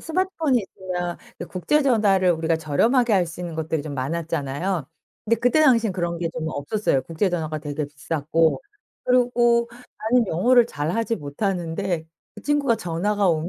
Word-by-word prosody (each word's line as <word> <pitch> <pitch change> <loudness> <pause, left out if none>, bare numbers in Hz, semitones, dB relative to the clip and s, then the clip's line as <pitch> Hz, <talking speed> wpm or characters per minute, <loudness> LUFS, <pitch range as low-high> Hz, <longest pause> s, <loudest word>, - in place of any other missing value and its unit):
스마트폰이 325 -6 0
있으면 180 -2 -5 0.2
이 - - -3
국제 240 - 0
전화를 200 -8 +3
우리가 160 0 0
저렴하게 225 - +2
할 185 -3 +3
수 165 +1 -9
있는 170 -2 -5
것들이 160 -1 -2
좀 150 -2 -6
많았잖아요. 155 +2 -2 0.4
근데 230 +2 +3
그때 245 +7 +2
당시에는 230 -8 +4
그런 170 -2 -2
게 170 -1 -1
좀 160 -1 -3
없었어요. 145 -1 -1
국제 165 +6 -1
전화가 155 -3 -2
되게 150 0 -4
비쌌고 155 +3 0 0.4
그리고 240 -1 +3 0.3
나는 230 +1 +2
영어를 235 +8 +4
잘하지 225 +9 -2
못하는데 170 +2 -2 0.3
그 - - -11
친구가 285 -5 +2
전화가 200 +1 0
오면 160 +1 0
180 Hz, 375 characters per minute, -23 LUFS, 160-230 Hz, 0.4 s, 당시에는